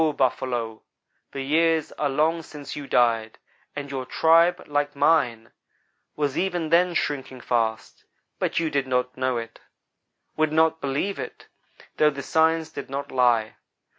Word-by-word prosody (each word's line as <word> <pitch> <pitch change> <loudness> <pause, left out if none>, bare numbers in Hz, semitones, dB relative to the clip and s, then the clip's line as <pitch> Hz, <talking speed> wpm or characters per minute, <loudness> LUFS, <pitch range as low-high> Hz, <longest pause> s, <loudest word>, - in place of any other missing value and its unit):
Buffalo, 120 -4 -1 0.5
the 135 - -4
years 160 +2 +2
are 145 - -1
long 155 +4 +1
since 150 -3 -9
you 145 -2 -7
died, 115 -3 +2 0.4
and 140 -1 -5
your 135 -1 -3
tribe, 165 +6 +3
like 145 0 -1
mine, 130 -6 +2 0.6
was 145 -2 -1
even 175 -4 -1
then 175 +1 +3
shrinking 135 -4 -2
fast, 115 -2 -2 0.4
but - - 0
you 165 -2 -1
did 140 -1 0
not 125 0 -1
know 130 -1 0
it; 115 0 -7 0.8
would 155 -1 +1
not 160 0 +2
believe 140 +9 -2
it; - - -7 0.5
though 150 - +5
the 140 -2 -6
signs 160 0 +2
did 140 - -7
not 140 +1 -5
lie. 120 -4 +2
140 Hz, 145 wpm, -24 LUFS, 125-160 Hz, 0.8 s, though